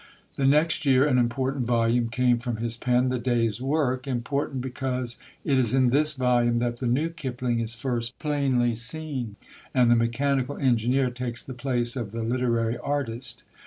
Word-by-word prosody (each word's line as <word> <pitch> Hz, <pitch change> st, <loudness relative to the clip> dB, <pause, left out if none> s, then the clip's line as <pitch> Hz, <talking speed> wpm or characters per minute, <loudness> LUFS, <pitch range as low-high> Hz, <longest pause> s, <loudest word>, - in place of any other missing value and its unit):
The 135 Hz, -, +1 dB
next 155 Hz, +3 st, +3 dB
year 135 Hz, -1 st, +4 dB
an 130 Hz, -4 st, +3 dB
important 130 Hz, +1 st, 0 dB
volume 115 Hz, 0 st, +2 dB
came 125 Hz, 0 st, +2 dB
from 120 Hz, -2 st, -3 dB
his 115 Hz, +1 st, -1 dB
pen, 125 Hz, +1 st, +1 dB
The 125 Hz, 0 st, -1 dB
Day's 115 Hz, -2 st, 0 dB
Work 135 Hz, -2 st, 0 dB
important 135 Hz, +2 st, -2 dB
because 125 Hz, -2 st, -3 dB, 0.3 s
it 135 Hz, -3 st, +3 dB
is 125 Hz, -1 st, +2 dB
in 130 Hz, -2 st, +3 dB
this 150 Hz, +3 st, +3 dB
volume 120 Hz, -2 st, +2 dB
that 120 Hz, 0 st, -1 dB
the 125 Hz, -, -3 dB
new 140 Hz, +7 st, +1 dB
Kipling 125 Hz, -7 st, -3 dB
is 115 Hz, 0 st, -3 dB
first 120 Hz, 0 st, -2 dB
plainly 135 Hz, -5 st, +1 dB
seen, 125 Hz, -1 st, -3 dB, 0.4 s
and 125 Hz, -2 st, +5 dB
the -, -, +6 dB
mechanical 130 Hz, +4 st, 0 dB
engineer 125 Hz, 0 st, +2 dB
takes 120 Hz, -1 st, -4 dB
the 130 Hz, -, -7 dB
place 125 Hz, -2 st, -1 dB
of 115 Hz, -5 st, -5 dB
the 115 Hz, 0 st, -3 dB
literary 115 Hz, -1 st, 0 dB
artist. 135 Hz, -4 st, -3 dB
125 Hz, 170 wpm, -26 LUFS, 120-135 Hz, 0.4 s, the